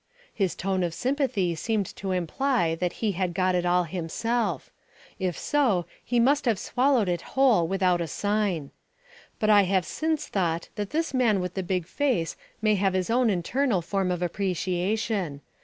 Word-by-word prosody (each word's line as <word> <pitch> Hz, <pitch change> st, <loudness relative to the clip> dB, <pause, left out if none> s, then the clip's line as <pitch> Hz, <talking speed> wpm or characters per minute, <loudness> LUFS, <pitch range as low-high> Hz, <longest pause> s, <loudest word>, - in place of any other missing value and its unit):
His 190 Hz, -5 st, 0 dB
tone 190 Hz, 0 st, -1 dB
of 170 Hz, -2 st, -1 dB
sympathy 250 Hz, -, 0 dB
seemed 210 Hz, +4 st, -1 dB
to 195 Hz, -, -4 dB
imply 180 Hz, -, 0 dB
that 175 Hz, +1 st, -2 dB
he 210 Hz, -, +2 dB
had 180 Hz, -2 st, -2 dB
got 185 Hz, 0 st, +2 dB
it 180 Hz, 0 st, +1 dB
all 180 Hz, 0 st, +3 dB
himself; 185 Hz, +8 st, -2 dB, 0.5 s
if 185 Hz, -3 st, -1 dB
so, 240 Hz, -, +1 dB, 0.2 s
he 240 Hz, 0 st, +1 dB
must 280 Hz, +5 st, +3 dB
have 230 Hz, -4 st, +2 dB
swallowed 250 Hz, -3 st, +2 dB
it 175 Hz, -1 st, -1 dB, 0.2 s
whole 240 Hz, -11 st, +5 dB
without 185 Hz, -1 st, +1 dB
a 170 Hz, -, -2 dB
sign. 205 Hz, -7 st, -1 dB, 0.7 s
But 215 Hz, 0 st, +3 dB
I 205 Hz, -1 st, +7 dB
have 185 Hz, -1 st, +1 dB
since 315 Hz, -1 st, -1 dB
thought 170 Hz, -4 st, -1 dB
that 205 Hz, -2 st, -4 dB
this 325 Hz, -1 st, -1 dB
man 235 Hz, -6 st, +3 dB
with 180 Hz, -1 st, -3 dB
the 190 Hz, -, -2 dB
big 180 Hz, -1 st, -1 dB
face 250 Hz, -, 0 dB, 0.3 s
may 215 Hz, -1 st, +4 dB
have 195 Hz, -1 st, +1 dB
his 185 Hz, +3 st, 0 dB
own 245 Hz, 0 st, +3 dB
internal 200 Hz, +2 st, 0 dB
form 190 Hz, +1 st, -1 dB
of 180 Hz, -1 st, -1 dB
appreciation. 185 Hz, -2 st, -1 dB
195 Hz, 175 wpm, -26 LUFS, 175-230 Hz, 0.7 s, I